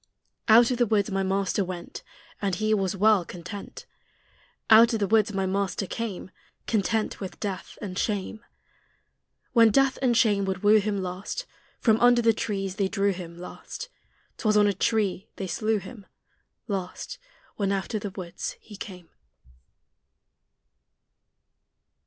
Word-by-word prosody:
Out 230 +2 +7
of 250 - -1
the 240 - +3
woods 205 -1 +1
my 195 0 0
Master 195 +1 0
went, 180 -2 -7 0.4
And 195 -3 0
He 215 +2 +1
was 195 -2 0
well 205 -1 +4
content. 180 +4 -9 0.9
Out 230 +2 +8
of 225 - 0
the 205 - +2
woods 215 +1 +3
my 195 -1 -1
Master 195 0 -1
came, 200 -3 -5 0.3
Content 220 0 0
with 190 -2 -7
death 195 -4 -5
and 190 -3 -5
shame. 210 +1 -2 1.1
When 230 -2 +7
Death 270 +4 +2
and 245 -3 +3
Shame 205 -5 +3
would 190 -1 -3
woo 215 +1 +6
Him 200 -2 -1
last, 185 - -5 0.3
From 220 -2 +3
under 245 0 +5
the 225 0 +5
trees 195 -3 -3
they 200 -2 +1
drew 200 0 +1
Him 170 -2 -8
last: 180 - -8 0.5
'Twas 215 -1 +2
on 210 - +6
a 205 - +2
tree 195 -1 0
they 195 - -4
slew 215 +5 0
Him 205 0 -10 0.6
last, 195 - -5 0.4
When 200 -2 0
out 195 +3 -2
of 215 - -1
the 205 - -4
woods 185 -3 -6
He 210 - -13
came. 180 -5 -9
205 Hz, 150 wpm, -26 LUFS, 190-220 Hz, 1.1 s, Out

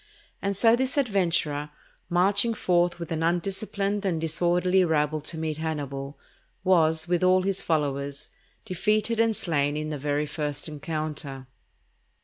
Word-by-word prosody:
And 200 -1 -1
so 225 +2 +6
this 260 +3 -1
adventurer, 170 - 0 0.4
marching 200 +6 +3
forth 175 -3 +1
with 170 -1 -6
an 160 -1 -1
undisciplined 195 +4 -1
and 180 -5 0
disorderly 175 +3 +2
rabble 155 -2 +1
to 160 +2 -3
meet 155 -1 -3
Hannibal, 140 -3 -4 0.5
was, 160 -3 +3
with 175 0 +1
all 185 0 +4
his 195 0 -1
followers, 140 -4 -2 0.3
defeated 215 +5 0
and 225 -1 +3
slain 145 -5 0
in 155 0 -3
the 150 - -4
very 145 +1 0
first 145 -1 -3
encounter. 150 -3 -5
165 Hz, 135 wpm, -26 LUFS, 150-190 Hz, 0.5 s, so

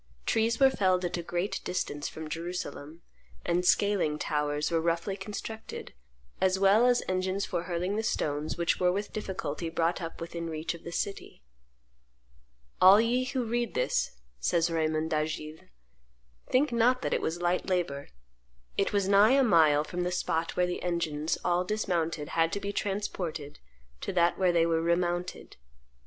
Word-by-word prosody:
Trees 225 +1 +1
were 270 -1 +6
felled 185 -5 +1
at 175 - -2
a - - -2
great 175 +3 -2
distance 145 -5 -3
from 160 0 -7
Jerusalem; 165 -1 -6 0.4
and 175 +1 +1
scaling 185 -5 +2
towers 150 0 -1
were 165 -1 +2
roughly 170 +3 -1
constructed, 210 +3 -7 0.5
as 190 0 +3
well 200 +5 +5
as 245 -1 +3
engines 185 +1 -1
for 170 - -3
hurling 180 +3 -2
the - - +1
stones 150 -7 -2
which 170 0 +1
were 180 -1 +3
with 200 +3 -3
difficulty 170 -6 -4
brought 165 +2 0
up 165 -1 -6
within 170 0 -5
reach 160 +1 -3
of 170 - -12
the 170 - -7
city. 195 - -4 1.4
"All 190 +3 +9
ye 245 +3 +2
who 255 0 -2
read 235 0 -2
this," 95 - 0 0.2
says 165 - +1
Raymond 160 0 0
d'Agiles, 155 0 -3 0.8
"think 270 +3 +3
not 245 +2 +3
that - - 0
it - - 0
was 165 +2 -2
light 175 +1 0
labor; 165 -7 -1 0.7
it - - +1
was 200 -2 +1
nigh 205 +4 +6
a 275 0 +5
mile 155 - +5
from 180 +3 -4
the 180 0 -1
spot 165 -2 -1
where 180 - +4
the 180 - -3
engines, 165 -3 -1
all 175 +1 +2
dismounted, 170 -6 -1
had 165 0 +1
to - - -1
be 200 0 -4
transported 185 -8 -3 0.4
to - - -4
that 175 -1 +2
where 185 -2 +4
they 170 -1 +3
were 165 -1 +1
remounted." 175 +1 -1
175 Hz, 165 wpm, -29 LUFS, 165-200 Hz, 1.4 s, All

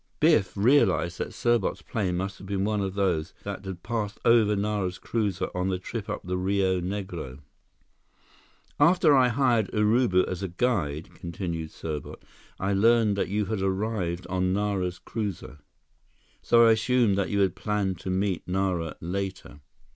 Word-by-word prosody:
Biff 150 - +3
realized 100 -7 +3
that - - -3
Serbot's 110 -3 0
plane 95 -5 -2
must 95 +1 -4
have 95 - -10
been 100 -1 -1
one 105 -1 0
of 95 -1 -3
those 90 -4 0
that 100 -1 -5
had 95 -2 -7
passed 110 -3 -3
over 110 -3 +5
Nara's 100 -3 -1
cruiser 105 -6 -2
on 90 +1 -1
the 95 - 0
trip 105 +3 -6
up 105 - -3
the 90 0 -2
Rio 95 -1 +1
Negro. 90 -8 -5 1.4
"After 170 -4 +5
I 130 -2 +5
hired 120 -4 +2
Urubu 105 -3 +3
as 90 0 -4
a 95 - -2
guide," 85 - -1
continued 85 -2 -5
Serbot, 75 -2 -6 0.4
"I 95 +1 0
learned 110 +1 +4
that 100 - -1
you 105 +1 0
had 95 0 -3
arrived 95 -2 -1
on 95 0 0
Nara's 95 -3 -1
cruiser. 100 -10 -5 0.8
So 115 0 +5
I 115 - +6
assumed 110 -1 +3
that 100 - 0
you 100 -1 +3
planned 95 -1 -2
to 95 - -6
meet 95 -1 -1
Nara 90 -3 -1
later." 95 -3 -5
100 Hz, 155 wpm, -26 LUFS, 90-110 Hz, 1.4 s, I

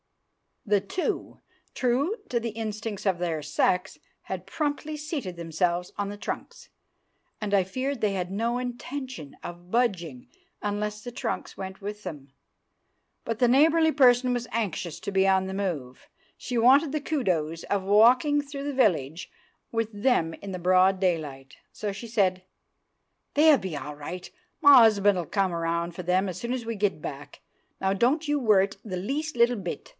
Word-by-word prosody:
The 205 -2 +3
two, 275 - -3 0.4
true 270 - +1
to 240 - +1
the 230 0 -3
instincts 215 -1 -5
of 190 -3 +2
their 165 -3 -1
sex, 180 +5 0 0.2
had - - -5
promptly 305 0 -2
seated 295 - -4
themselves 170 +1 -1
on 205 -1 -2
the 205 - -7
trunks, - - -6 0.7
and 210 -2 -3
I 195 -2 +5
feared 255 +7 -3
they 210 -2 +1
had 180 -1 -3
no 230 +4 0
intention 250 - -6
of 175 +1 -9
budging 180 - -1 0.3
unless 210 +1 -3
the 245 - -6
trunks 240 - -4
went 190 +1 -7
with 210 +1 -6
them. 140 -3 -8 0.9
But 225 -1 -3
the 245 - +5
neighbourly 320 +5 +5
person 250 -3 +4
was 245 -1 -2
anxious 185 -7 -3
to - - -4
be 195 0 +3
on 190 -1 +3
the 190 - -4
move; 160 -11 -4 0.3
she 245 - -4
wanted 270 +6 +5
the 305 0 -2
kudos 175 - -1
of 200 -1 -1
walking 245 +9 +5
through 280 -1 -7
the 285 0 -3
village 170 - +1 0.4
with 225 -1 -1
them 205 -6 +1
in 200 - -8
the 185 - -4
broad 185 +2 +4
daylight, 150 -7 -2
so 210 -1 -4
she 200 +4 -8
said— 190 -5 +1 0.9
"They'll 300 0 +6
be 190 -8 -5
all 145 +1 -6
right; 175 +5 -7 0.3
my 275 -5 +9
'usband'll 200 -4 +2
come 195 -3 +1
round 170 0 -1
for 180 - -6
them 185 +2 +1
soon 235 +8 -4
as 250 -3 -4
we 230 0 -3
get 200 -6 0
back. 140 0 -8 0.4
Now 190 0 +1
don't 270 +10 +1
you 295 0 +1
worrit 200 -5 +3
the 185 -4 -4
least 285 +11 -3
little 240 +1 +4
bit." 180 -4 -6
205 Hz, 165 wpm, -27 LUFS, 180-245 Hz, 0.9 s, my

